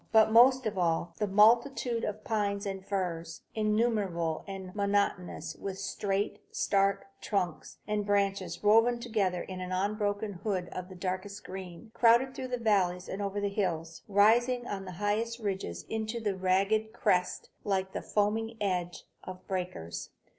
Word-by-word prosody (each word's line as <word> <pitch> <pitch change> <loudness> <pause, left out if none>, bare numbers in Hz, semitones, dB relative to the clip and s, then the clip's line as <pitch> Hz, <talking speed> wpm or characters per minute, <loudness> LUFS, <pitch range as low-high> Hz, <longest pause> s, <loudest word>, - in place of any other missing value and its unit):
But 220 -1 +6
most 255 +2 +6
of 205 -3 -1
all, 170 0 0
the 210 - +1
multitude 230 +4 +4
of 210 +1 -3
pines 205 -2 -1
and 195 -1 -4
firs, 170 -4 -3
innumerable 210 -7 0
and 190 -2 -7
monotonous, 200 -3 -1
with 195 -1 -5
straight, 195 +1 -2
stark 195 0 +1 0.2
trunks, 180 -6 -2
and 210 -1 0
branches 200 -1 0
woven 225 +3 +5
together 205 -7 0
in 185 -1 -7
an 180 0 -5
unbroken 205 +2 -1
Hood 190 -4 -1
of 185 0 -7
darkest 190 +3 -4
green, 185 +3 -8
crowded 240 +3 +4
through 260 - -5
the 250 0 -2
valleys 190 -6 +1
and 195 - -4
over 200 0 -2
the 205 - 0
hills, 170 -5 -2
rising 235 +5 +4
on 195 -4 -4
the 185 - -7
highest 210 +5 -1
ridges 190 - -4
into 220 +1 -3 0.2
ragged 195 +4 +1
crests, 180 -3 0
like 190 -1 -1
the - - -3
foaming 220 +2 0
edge 180 -4 -2 0.2
of 185 0 -9
breakers. 180 - -4
200 Hz, 145 wpm, -30 LUFS, 185-220 Hz, 0.2 s, But